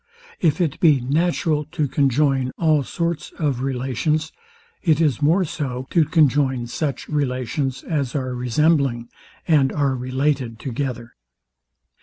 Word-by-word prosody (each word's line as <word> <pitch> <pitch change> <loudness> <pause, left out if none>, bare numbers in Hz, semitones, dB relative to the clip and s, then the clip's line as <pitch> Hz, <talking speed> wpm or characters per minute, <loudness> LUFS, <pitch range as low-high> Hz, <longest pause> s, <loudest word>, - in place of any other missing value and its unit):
If 165 0 +2
it 160 -5 0
be 150 -5 +5
natural 150 +3 0
to 150 - 0
conjoin 135 -1 +1
all 155 -3 +3
sorts 170 +3 -3
of 140 -6 -1
relations, 135 +4 -1 0.5
it 160 -4 +2
is 150 -4 +1
more 170 +6 +3
so, 130 -5 -4
to 165 -3 +4
conjoin 140 -5 +2
such 140 +4 -3
relations 130 -2 -2
as 140 -6 -2
are 130 -2 -2
resembling, 125 -1 +1 0.4
and 145 -5 +4
are 140 -2 +1
related 130 -1 -1
together. 120 -1 -4
140 Hz, 125 wpm, -22 LUFS, 130-155 Hz, 0.5 s, be